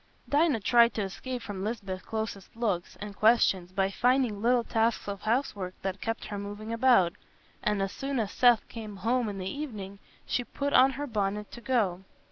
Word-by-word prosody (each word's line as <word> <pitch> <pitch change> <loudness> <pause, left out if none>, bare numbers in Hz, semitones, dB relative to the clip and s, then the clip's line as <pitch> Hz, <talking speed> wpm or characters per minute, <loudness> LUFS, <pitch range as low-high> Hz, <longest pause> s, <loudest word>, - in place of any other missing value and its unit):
Dinah 290 -5 +2
tried 235 +2 +5
to 215 - 0
escape 245 +6 -5
from 195 -2 -5
Lisbeth's 200 -4 -4
closest 220 -3 -5
looks 205 -7 -2
and 205 -1 -7
questions 200 -5 +3
by 195 +1 0
finding 245 -2 +2
little 240 +1 +3
tasks 225 -1 0
of 200 -1 -4
housework 215 -6 -1
that 190 0 -3
kept 225 0 -3
her 205 -1 -5
moving 205 +2 -6
about, 230 -8 +4 0.5
and 210 -2 +1
as 195 - -2
soon 275 +2 -3
as 210 -3 -1
Seth 245 -3 +4
came 215 -3 -8
home 230 +4 0
in 200 - -5
the 185 - -5
evening 200 -6 -6 0.3
she 245 - -1
put 280 +3 -3
on 265 +1 +6
her 285 +2 -4
bonnet 210 -4 -2
to 240 - -10
go. 215 -9 +1
215 Hz, 185 wpm, -29 LUFS, 195-245 Hz, 0.5 s, on